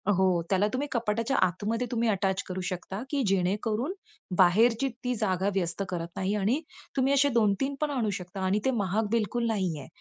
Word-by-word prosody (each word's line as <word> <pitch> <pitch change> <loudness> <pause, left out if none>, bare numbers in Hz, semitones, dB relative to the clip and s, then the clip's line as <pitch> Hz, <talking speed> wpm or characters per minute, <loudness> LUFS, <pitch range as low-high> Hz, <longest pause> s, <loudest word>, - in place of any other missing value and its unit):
हो, 185 -2 +3
त्याला 195 +1 +3
तुम्ही 285 +3 -1
कपाटाच्या 230 +2 0
आतमध्ये 215 +7 -2
तुम्ही 235 -1 +1
अटॅच 190 -2 +1
करू 185 0 -4
शकता 190 +3 -5
की 285 -2 0
जेणेकरून 210 - 0 0.4
बाहेरची 225 +8 +4 0.2
ती 250 0 0
जागा 195 -3 0
व्यस्त 185 +1 -1
करत 170 -2 -3
नाही 190 +2 -1
आणि 220 +10 +1 0.4
तुम्ही 265 +1 +3
असे 280 +1 +4
2-3 235 +3 +1
पण 300 - +1
आणू 240 -6 0
शकता 180 0 -7
आणि 195 +3 +2
ते 265 - +3
महाग 205 0 0
बिलकुल 235 +1 0
नाहीये 180 -10 -2
210 Hz, 175 wpm, -28 LUFS, 185-240 Hz, 0.4 s, बाहेरची